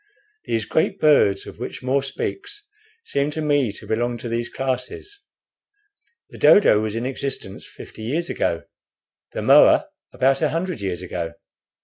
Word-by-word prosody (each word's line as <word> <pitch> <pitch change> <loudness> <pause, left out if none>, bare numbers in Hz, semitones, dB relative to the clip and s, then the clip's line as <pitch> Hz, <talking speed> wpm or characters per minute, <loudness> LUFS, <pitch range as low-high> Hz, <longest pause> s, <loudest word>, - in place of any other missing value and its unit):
These 110 -2 -1
great 160 - 0
birds, 120 -10 +4
of - - -11
which 125 - -6
More 135 +2 +1
speaks, 410 - -5 0.4
seem 140 +1 0
to 150 - -5
me 145 -6 +2
to - - -11
belong 120 +2 -1
to 120 - -7
these 120 +1 -2
classes. 135 - -4 1.1
The - - -12
dodo 110 - +6
was 110 0 -3
in 115 +2 -2
existence 135 -7 -4
fifty - - -12
years 150 +10 -2
ago, 85 - -1 0.7
the - - -4
moa - - +6 0.2
about 135 +1 +2
a 155 - +2
hundred 170 - -3
years 95 -2 -3
ago. 85 -2 -4
130 Hz, 150 wpm, -22 LUFS, 110-150 Hz, 1.1 s, dodo